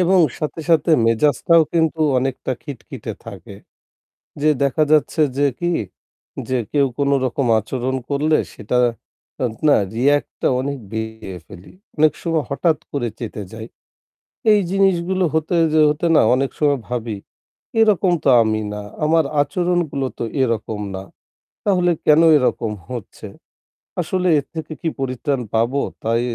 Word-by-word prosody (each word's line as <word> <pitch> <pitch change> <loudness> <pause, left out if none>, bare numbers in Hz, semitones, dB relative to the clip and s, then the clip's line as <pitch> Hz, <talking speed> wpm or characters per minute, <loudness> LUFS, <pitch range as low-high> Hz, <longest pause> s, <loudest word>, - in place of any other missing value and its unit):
এবং 185 +1 +4 0.2
সাথে, 155 +1 -4
সাথে 165 0 +3 0.2
মেজাজটাও 145 +7 +3
কিন্তু 160 -1 +1 0.2
অনেকটা 130 0 -2
খিটখিটে 140 -6 -8
থাকে। - - -10 0.9
যে 150 - +2
দেখা 140 +3 +2
যাচ্ছে 155 +1 +2 0.2
যে 145 - +4
কি, 175 0 0 0.8
যে 130 -1 +1
কেউ 140 -2 +3
কোন 140 -1 +1
রকম 130 +1 -1
আচরণ 125 +4 -3 0.2
করলে 150 +2 +2 0.2
সেটা 125 +4 -2 0.7
আত 115 - -2
না 145 - +6 0.2
react 145 +5 +2
টা - - +2
অনেক 140 +1 -3
দিয়ে 110 -3 -5
ফেলি। 95 -3 -13 0.2
অনেক 155 0 +4
সময় 165 -3 0
হঠাৎ 155 +2 +1
করে 125 -5 -1
চেঁতে 110 -3 -6
যাই। 110 0 -7 0.9
এই 210 - +5
জিনিসগুলো 190 -1 +1
হতে 160 +2 0 0.2
যে 155 - +4
হতে 150 +3 0
না - - +6
অনেক 135 +1 0
সময় 145 -2 +2
ভাবি, 120 -3 -3 0.6
এরকম 205 -4 +4
তো - - +3
আমি 110 0 0
না। 105 - -5 0.2
আমার 160 0 +3 0.2
আচরণগুলো 170 -2 -1
তো - - -1 0.2
এরকম 110 -3 -1 0.2
না। 95 - -5 0.6
তাহলে 180 -3 +3
কেন 150 +1 +6 0.2
এরকম 120 -4 0 0.2
হচ্ছে? 120 -5 -8 0.7
আসলে 180 +2 -1
এর 140 - -7
থেকে 160 -1 -6
কি 170 - -2
পরিত্রাণ 135 +1 -2
পাবো? 120 +5 +1 0.2
তাই 115 +1 +1
140 Hz, 140 wpm, -20 LUFS, 120-165 Hz, 0.9 s, না